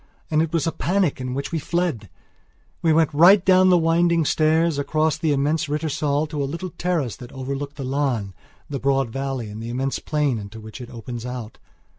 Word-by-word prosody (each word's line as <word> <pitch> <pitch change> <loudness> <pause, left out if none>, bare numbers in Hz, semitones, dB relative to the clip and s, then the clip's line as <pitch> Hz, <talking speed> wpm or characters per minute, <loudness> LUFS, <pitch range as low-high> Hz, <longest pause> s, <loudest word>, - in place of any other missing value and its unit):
And 155 0 +3
it 160 -1 -1
was 165 -4 0
a 165 - +1
panic 180 -7 0
in 125 0 -3
which 140 +1 -4
we 165 - -1
fled! 160 - -2 0.7
We 165 - +3
went 155 -1 +3
right 180 +6 +6
down 185 0 +6
the 180 - +6
winding 165 0 +3
stairs, 160 0 +2
across 155 +2 +1
the 160 -1 0
immense 145 +3 +1
Rittersaal 150 -1 0
to 150 -2 -3
a - - 0
little 170 +4 -5
terrace 170 -8 -1
that 125 -2 -11
overlooks 140 +2 -5
the 140 - -6
Lahn, 130 -8 -1 0.3
the 140 -2 -4
broad 135 -3 +1
valley 135 -2 -3
and 105 +1 -8
the 115 - -6
immense 130 +3 -2
plain 150 -6 0
into 105 +2 -9
which 110 +3 -10
it 120 - -8
opens 120 -1 -7
out. 125 -3 -7
145 Hz, 200 wpm, -23 LUFS, 130-165 Hz, 0.7 s, right